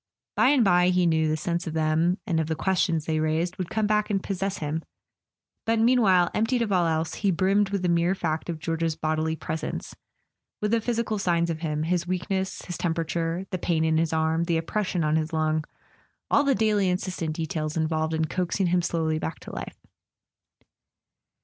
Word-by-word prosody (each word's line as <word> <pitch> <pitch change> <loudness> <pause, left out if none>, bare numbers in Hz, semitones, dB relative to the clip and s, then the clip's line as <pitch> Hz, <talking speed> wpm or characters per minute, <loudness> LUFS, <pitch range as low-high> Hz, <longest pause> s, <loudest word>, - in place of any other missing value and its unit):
By - - +4
and 275 -4 +4
bye, 180 -1 +4
he 180 -1 +3
knew, 160 -1 +2
the 155 0 0
sense 170 +2 -2
of 160 - -3
them, 160 +3 +2
and 170 -7 0
of 160 - -1
the 160 - -1
questions 170 -2 0
they 160 -1 0
raised, 160 +3 0
would 185 -3 -4
come 220 -1 0
back 210 +1 +1
and 195 -2 0
possess 195 0 -2
him; 155 +1 -3 0.8
but 225 0 +1
meanwhile, 220 -7 +4
emptied 235 +2 +1
of 215 - -3
all 180 -3 +3
else, 160 0 -1
he 200 - 0
brimmed 195 +3 +2
with 200 -2 -2
the - - +2
mere 170 +2 +2
fact 160 -2 -2
of 165 - -2
George's 165 0 -1
bodily 155 +1 -1
presence, 160 0 -5 0.7
with 210 0 -1
the 230 -1 +2
physical 230 -2 -1
signs 170 -3 +1
of 160 - -4
him, 155 -2 -2
his 175 +1 0
weakness, 190 +1 -2
his 175 - -6
temperature, 165 +1 -1
the 185 - -2
pain 165 -2 +1
in 160 0 +2
his 165 0 +1
arm, 160 +1 +1
the 170 -1 +1
oppression 180 +1 -1
on 155 +1 +2
his 160 +1 -2
lung, 155 0 +1 0.7
all 285 - +5
the 280 -2 +3
daily 210 -2 +2
insistent 180 -3 -2
details 160 -2 -3
involved 160 0 0
in 160 0 +1
coaxing 180 +4 -1
him 175 0 +2
slowly 160 -2 -1
back 160 0 -4
to - - -10
life. - - -6
170 Hz, 195 wpm, -26 LUFS, 160-190 Hz, 0.8 s, all